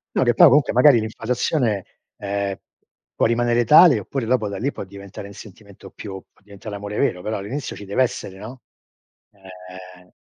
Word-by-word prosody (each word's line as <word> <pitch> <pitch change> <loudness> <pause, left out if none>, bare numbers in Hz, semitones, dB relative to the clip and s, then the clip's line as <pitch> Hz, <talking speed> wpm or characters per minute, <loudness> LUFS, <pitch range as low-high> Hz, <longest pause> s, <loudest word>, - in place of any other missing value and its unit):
No - - +2
che 120 - +2
poi 170 +9 +7
comunque 145 -1 +3
magari 125 0 +5
l'infatuazione 115 - -2 0.4
ehm, 100 -1 -3 0.6
può - - +1
rimanere 120 +1 +1
tale, 155 -3 +7
oppure 120 +5 -5
dopo 115 -2 0
da 100 -1 -5
lì 135 +8 -2
può - - -8
diventare 100 +1 -11
un 100 - -12
sentimento 100 0 -14
più 95 -2 -9
può - - -32
diventare 100 +1 -11
l'amore 105 +1 -6
vero. 90 -1 0
Però 110 +3 -4
all'inizio 120 +8 -6
ci - - -10
deve 100 +6 0
essere, 95 -5 -5
no, 120 +6 -10 0.7
ehm, 90 -1 -14
105 Hz, 175 wpm, -21 LUFS, 100-120 Hz, 0.7 s, poi